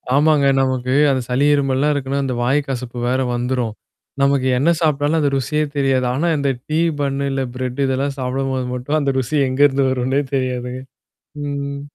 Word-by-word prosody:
ஆமாங்க. 150 -1 +4 0.2
நமக்கு, 130 -1 0 0.2
அந்த 130 -1 0
சளி 130 +3 +2
இருமல்லாம் 140 +1 +1
இருக்குன்னா, 140 0 -2
அந்த 130 - -2
வாய் 140 +4 +2
கசப்பு 125 -2 -5
வேற 130 +1 +1 0.2
வந்துரும். 120 -2 -1 0.5
நமக்கு 140 -1 +2
என்ன 150 +6 +2
சாப்பிட்டாலும் 150 +1 +1
அந்த 145 -2 +2
ருசியே 150 +4 0
தெரியாது. 135 -2 +2
ஆனா 160 +6 0
இந்த 140 -1 0 0.2
டீ 155 +1 0 0.2
பன்னு 140 0 -1
இல்ல 135 -1 -1
பிரெட் 130 +1 -4
இதெல்லாம் 135 +1 -1
சாப்பிடும்போது 130 0 -2
மட்டும் 130 +5 -1
அந்த 140 -2 0
ருசி 130 +4 -1
எங்கேருந்து 135 +1 +3
வரும்ன்னே 130 +2 0
தெரியாதுங்க. 125 -1 -2 0.6
ம். 140 0 -4
135 Hz, 160 wpm, -19 LUFS, 130-140 Hz, 0.6 s, ஆமாங்க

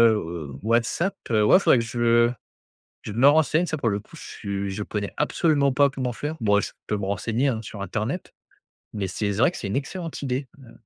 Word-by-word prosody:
heu, 80 -6 -5
WhatsApp, 120 - +1 0.2
heu, 105 -1 +4
ouais 145 - +6
faudrait 130 - +4
que - - -1
je 120 0 +3 0.7
je 105 - -6
me 120 +6 +4
renseigne. 160 +3 +4
Ça 155 -2 -3
pour 120 - 0
le 100 0 -1
coup, - - -16
je - - -10
suis 100 -1 -4
je 105 +2 -4
connais 105 -1 -4
absolument 150 -2 +2
pas 140 +1 +4
comment 130 -2 -3
faire. 150 +7 -4
Bon, 105 -1 +4
eh, - - +1
je - - -5
peux 105 - -1
me 95 - -3
renseigner, 115 +7 0
hein, 115 -3 -1
sur 105 -1 -9
internet. 110 - -4 0.6
Mais 100 -2 -2
c'est 100 +3 -2
vrai 115 - +3
que - - -8
c'est 100 - -4
une 100 - -2
excellente 165 +4 -4
idée. 130 0 -2
Ouais. 125 -4 -15
115 Hz, 220 wpm, -24 LUFS, 105-140 Hz, 0.7 s, ouais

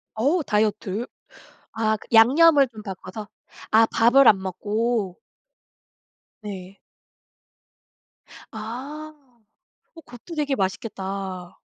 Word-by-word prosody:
어. 290 +10 +1
다이어트. 210 -1 -1 0.7
아 220 -1 0
그 - - -16
양념을 280 +5 +6
좀 220 -3 -12
바꿔서 195 +1 -8 0.4
아 225 +1 +5
밥을 240 +4 +5
안 200 - +6
먹고. 205 +1 -2 1.2
네. 195 -2 -9 1.7
아. 265 +8 -7 0.8
어 330 - -13
그것도 245 +8 -11
되게 290 -3 0
맛있겠다. 190 -2 -5
220 Hz, 165 characters per minute, -23 LUFS, 195-255 Hz, 1.7 s, 양념을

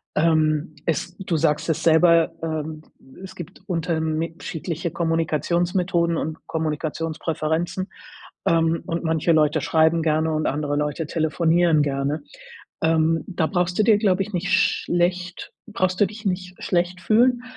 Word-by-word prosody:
Ähm, 155 -1 +2
es 165 - -2
du 185 -4 -2
sagst 150 0 +1
es 160 0 0
selber, 165 0 +5
ähm, 155 -1 -4 0.4
es 185 -1 -9
gibt 180 +1 -10
unterme 165 -2 -1
schiedliche 165 +1 -4
Kommunikationsmethoden 170 +2 0
und 155 +1 -5
Kommunikationspräferenzen, 160 +3 -2 0.6
ähm, 165 0 +2
und 170 -2 -3
manche 160 +1 +2
Leute 155 -1 +3
schreiben 160 +3 +2
gerne 160 0 +1
und 155 0 0
andere 145 0 -1
Leute 150 +2 -2
telefonieren 165 0 +2
gerne. 140 +1 -1 0.6
Ähm, 160 0 +2
da 175 -4 -1
brauchst 180 0 -1
du - - +5
dir, 215 -2 +5
glaube 195 -3 +2
ich 210 - -7
nicht 180 0 -1
schlecht 180 +1 0 0.2
brauchst 185 -4 -1
du 205 - +6
dich 210 +3 -10
nicht 180 -1 -3
schlecht 180 +1 0
fühlen, 240 +5 +3
165 Hz, 135 wpm, -23 LUFS, 155-180 Hz, 0.6 s, du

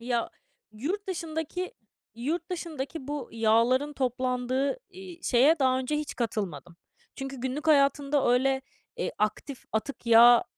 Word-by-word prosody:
Ya, 235 -1 -1 0.4
yurt 340 - -3
dışındaki 330 +1 -4 0.4
yurt 320 +10 -3
dışındaki 320 -5 -5
bu 290 -4 -4
yağların 230 +6 +3
toplandığı, 255 - -1
iii, 365 -2 -11
şeye 280 +6 +4
daha 260 -1 +3
önce 260 +4 -1
hiç 300 -1 -4
katılmadım. 195 - -4 0.4
Çünkü 270 0 -6
günlük 265 +5 -3
hayatımda 280 -2 +3
öyle, 265 +1 +2 0.3
eee, 480 - -2
aktif 215 +5 -2
atık 235 +3 -3
yağ 235 +1 +8
270 Hz, 125 wpm, -28 LUFS, 240-300 Hz, 0.4 s, yağ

